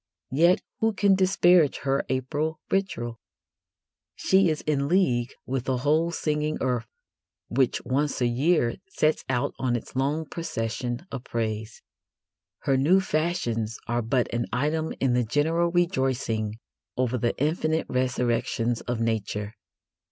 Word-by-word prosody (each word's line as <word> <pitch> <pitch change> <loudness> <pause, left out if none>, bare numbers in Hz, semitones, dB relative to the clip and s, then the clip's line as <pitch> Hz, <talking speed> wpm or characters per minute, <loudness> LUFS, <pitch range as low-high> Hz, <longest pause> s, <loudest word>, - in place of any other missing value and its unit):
Yet 170 +7 +4 0.2
who 225 0 +2
can 200 0 +4
disparage 180 -4 +4
her 135 0 +1
April 145 +5 -1
ritual? 120 -13 -1 1.0
She 190 -2 +3
is 155 -1 -1
in 140 -2 0
league 135 -9 +2
with 130 -1 -2
the 130 -2 0
whole 155 +6 +2
singing 150 -2 -1
earth, 125 -3 -1 0.6
which 130 +1 +1
once 145 +3 0
a 125 - +2
year 120 +1 +2
sets 155 -4 +1
out 130 +2 0
on 125 -2 +1
its 120 - -6
long 145 +5 0
procession 120 -4 -4
of 135 -3 -5
praise. 110 -1 -3 0.8
Her 135 - +2
new 160 +9 +4
fashions 155 - -1
are 120 +1 0
but 120 +2 0
an 120 0 -1
item 155 +5 0
in 130 -2 +2
the 125 0 +2
general 160 +8 +1
rejoicing 130 - 0 0.4
over 125 -1 +1
the 120 +1 0
infinite 155 +2 0
resurrections 120 -2 0
of 120 -2 -3
Nature. 105 -2 -2
135 Hz, 135 wpm, -26 LUFS, 120-160 Hz, 1.0 s, Yet